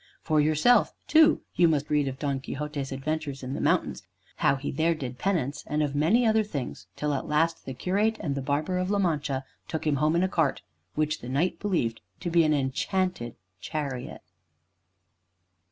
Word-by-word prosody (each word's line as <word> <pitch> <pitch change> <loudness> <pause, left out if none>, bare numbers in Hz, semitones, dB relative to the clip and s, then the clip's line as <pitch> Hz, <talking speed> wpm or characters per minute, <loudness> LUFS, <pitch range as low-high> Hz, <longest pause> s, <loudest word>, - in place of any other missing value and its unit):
For 155 -2 +3
yourself, 155 +10 +4
too, 315 0 +5
you 175 - +5
must 150 -2 0
read 145 -2 +2
of 135 0 -4
Don 140 -2 -1
Quixote's 145 0 -4
adventures 140 0 -3
in 130 +1 -4
the - - -3
mountains; - - +1 0.4
how - - +3
he 135 +1 -4
there 165 +4 +1
did 125 -4 -6
penance; 160 -8 -1
and 150 +1 0
of 145 -2 -1
many 175 +12 +3
other 220 -1 +4
things, 145 -11 -5
till 150 -1 -1
at 135 - -3
last 160 +2 +1
the 130 - -5
Curate 210 - +1
and 145 - -2
the 140 - -3
Barber 150 +7 -1
of 185 +1 -1
La 205 - +2
Mancha 150 -7 0 0.2
took 160 - -4
him 150 -2 +2
home 155 +4 +2
in 170 - +3
a - - +3
cart 160 -7 0 0.3
which 155 0 0
the 120 - -7
Knight 145 +8 0
believed 160 - -1 0.2
to 175 - -3
be 170 0 +5
an 155 - +2
enchanted 140 - -1 0.2
chariot. 140 - -5
150 Hz, 185 wpm, -27 LUFS, 140-175 Hz, 0.4 s, too